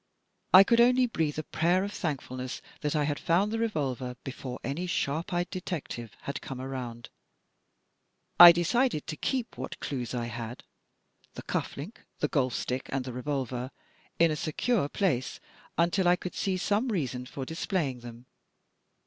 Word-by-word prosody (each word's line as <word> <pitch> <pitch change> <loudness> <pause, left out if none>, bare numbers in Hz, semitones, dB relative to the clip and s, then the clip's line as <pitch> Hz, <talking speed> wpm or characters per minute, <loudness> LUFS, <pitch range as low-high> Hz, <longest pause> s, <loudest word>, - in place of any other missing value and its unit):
I 185 +1 +10
could 235 +3 +4
only 250 +1 +5
breathe 160 -11 -1
a 155 - -2
prayer 175 +5 +1
of 205 +1 -4
thankfulness 130 -5 -4 0.2
that 150 +1 -1
I 150 - +2
had 145 0 -1
found 190 +5 +2
the 225 - -1
revolver 135 - -2
before 130 -1 -6
any 145 +9 -3
sharp 165 +2 -1
eyed 175 0 -1
detective 165 - -5
had 140 - -5
come 130 -2 -6
around. 125 -3 -6 1.3
I 175 0 +14
decided 175 - +1
to 155 - -4
keep 245 - -2
what 130 - -5
clues 125 -3 -3
I 120 -1 -1
had, 115 +1 -6 0.7
the - - -7
cuff - - -3
link, 160 +12 -8 0.2
the - - 0
golf 130 -5 0
stick 130 +1 -3
and 135 -2 -1
the 130 - -5
revolver, 130 -1 -3 0.5
in 165 -2 +5
a - - 0
secure 155 +3 0
place 145 -11 0 0.4
until 175 +3 +2
I 175 - +6
could 180 0 -6
see 190 -2 -1
some 205 +6 +1
reason 130 - -2
for 135 +1 -6
dis 160 +4 -5
playing 145 -10 0
them. 120 0 -11
150 Hz, 165 wpm, -29 LUFS, 130-185 Hz, 1.3 s, I